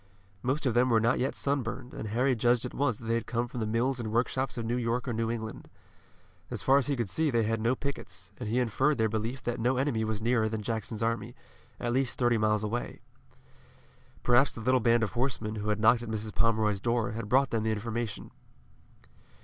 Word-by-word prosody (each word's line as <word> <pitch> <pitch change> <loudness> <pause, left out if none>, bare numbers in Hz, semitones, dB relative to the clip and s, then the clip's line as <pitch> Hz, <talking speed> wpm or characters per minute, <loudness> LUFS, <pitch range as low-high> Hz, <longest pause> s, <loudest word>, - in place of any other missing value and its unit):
Most 135 +6 -1
of 125 - +2
them 125 +2 +3
were 115 -2 +4
not 115 +3 +2
yet 130 +2 -1
sunburned, 130 -2 -2
and 110 - -5
Harry 125 +5 +2
judged 120 +1 +2
at 125 - -6
once 130 -6 0
that 115 - -11
they 115 - 0
had 115 -1 -1
come 120 +1 -1
from 120 - -6
the 110 - -1
mills 120 +4 0
and 110 -2 -3
workshops 130 +3 0
of 115 - -3
New 120 +2 0
York 120 +2 -1
or 120 - -1
New 115 0 -1
England. 110 -1 -5 0.8
As - - -4
far 135 +1 +5
as 135 - -2
he 145 - +1
could 120 -4 -1
see 155 +11 0
they 120 -4 +2
had 110 0 -1
no 120 +3 +2
pickets, 95 -10 -6
and 115 -4 -4
he 115 - 0
inferred 130 +5 +2
their 110 -1 +3
belief 115 +4 -3
that 120 0 -2
no 125 +3 +1
enemy 130 -4 +1
was 110 -1 -2
nearer 115 -1 +2
than 110 -1 -4
Jackson's 110 0 -3
army, 115 +1 -2 0.4
at 120 0 -1
least 130 -1 +1
thirty 120 -2 +2
miles 105 0 +2
away. 115 +3 -3 1.2
Perhaps 125 +2 +4
the 115 - -8
little 130 +3 +3
band 115 0 +3
of 110 - -1
horsemen 120 -4 -1
who 105 0 -3
had 105 0 0
knocked 115 +2 +5
at 120 - -6
Mrs. 110 -1 -3
Pomeroy's 110 -3 +2
door 120 0 0
had 110 -1 -5
brought 135 +2 +3
them 115 - +1
the 110 0 0
information. 110 0 -4
115 Hz, 225 wpm, -29 LUFS, 110-125 Hz, 1.2 s, far